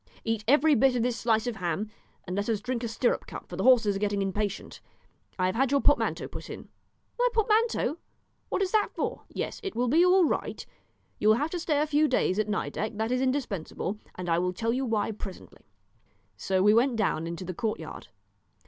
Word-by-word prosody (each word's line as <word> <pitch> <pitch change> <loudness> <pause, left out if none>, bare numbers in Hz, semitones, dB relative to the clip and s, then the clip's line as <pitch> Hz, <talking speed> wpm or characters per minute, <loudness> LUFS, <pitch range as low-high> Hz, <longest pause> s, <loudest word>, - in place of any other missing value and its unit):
Eat 225 -2 -1
every 295 +4 +5
bit 270 -1 +4
of 240 - +1
this 245 -1 0
slice 225 -1 +2
of 240 -3 -3
ham, 190 +4 -2 0.3
and 180 - -4
let 205 +3 -1
us 220 -3 +1
drink 245 +2 -3
a - - -1
stirrup 230 +2 0
cup, - - -8
for - - -7
the - - -3
horses 230 -6 +5
are - - -2
getting 205 -1 0
impatient. 200 +1 -3 0.6
I 185 - +1
have 185 - +1
had 265 +3 +2
your 280 +1 +3
portmanteau 290 - +2
put - - -9
in." - - -9 0.5
"My - - +4
portmanteau! 445 -6 +2 0.5
what 390 - 0
is 375 - -2
that 430 -1 +2
for?" - - -3
"Yes, - - -4
it 390 -3 -5
will 245 +1 +1
be 315 +8 +4
all 365 0 +5
right; - - -2 0.5
you 210 - +1
will 215 - +7
have 295 +7 -1
to 355 - -2
stay 310 -3 0
a 300 - +2
few 305 0 +3
days 215 -7 +1
at 215 0 0
Nideck, 210 +1 -2
that 220 +2 -1
is 255 0 +1
indispensable, 225 - -2 0.2
and 180 -1 -6
I 165 0 +2
will 180 +1 0
tell 230 +4 -1
you 260 +1 -1
why 220 -1 0
presently." 200 -3 -10 0.7
So 190 -1 0
we 210 +1 +6
went 240 +3 +3
down 195 -7 0
into 170 +2 -5
the 185 - -4
courtyard. 220 +3 -4
230 Hz, 215 wpm, -28 LUFS, 205-280 Hz, 0.7 s, will